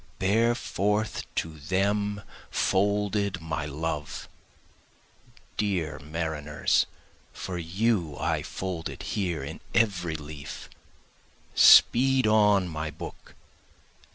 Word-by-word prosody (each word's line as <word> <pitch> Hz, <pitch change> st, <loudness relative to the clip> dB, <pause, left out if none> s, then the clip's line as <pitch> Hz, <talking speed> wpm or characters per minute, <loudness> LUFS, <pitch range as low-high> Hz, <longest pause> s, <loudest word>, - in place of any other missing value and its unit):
Bear 115 Hz, +5 st, +3 dB
forth 105 Hz, 0 st, -1 dB
to 80 Hz, -1 st, -3 dB
them 100 Hz, +5 st, 0 dB, 0.3 s
folded 100 Hz, 0 st, +1 dB
my 80 Hz, -2 st, -3 dB
love, 75 Hz, 0 st, -4 dB, 1.3 s
(dear 90 Hz, -7 st, -1 dB
mariners, 75 Hz, -1 st, 0 dB, 0.4 s
for 90 Hz, -2 st, -5 dB
you 85 Hz, -2 st, 0 dB
I -, -, 0 dB
fold 90 Hz, -4 st, -4 dB
it -, -, -8 dB
here 90 Hz, -8 st, -1 dB
in 80 Hz, +3 st, -7 dB, 0.2 s
every 90 Hz, -8 st, +2 dB
leaf;) 75 Hz, -1 st, -8 dB, 0.8 s
Speed 130 Hz, +1 st, +7 dB
on 105 Hz, -3 st, +4 dB
my 75 Hz, -2 st, -4 dB
book! -, -, -10 dB
95 Hz, 95 wpm, -27 LUFS, 80-105 Hz, 1.3 s, Speed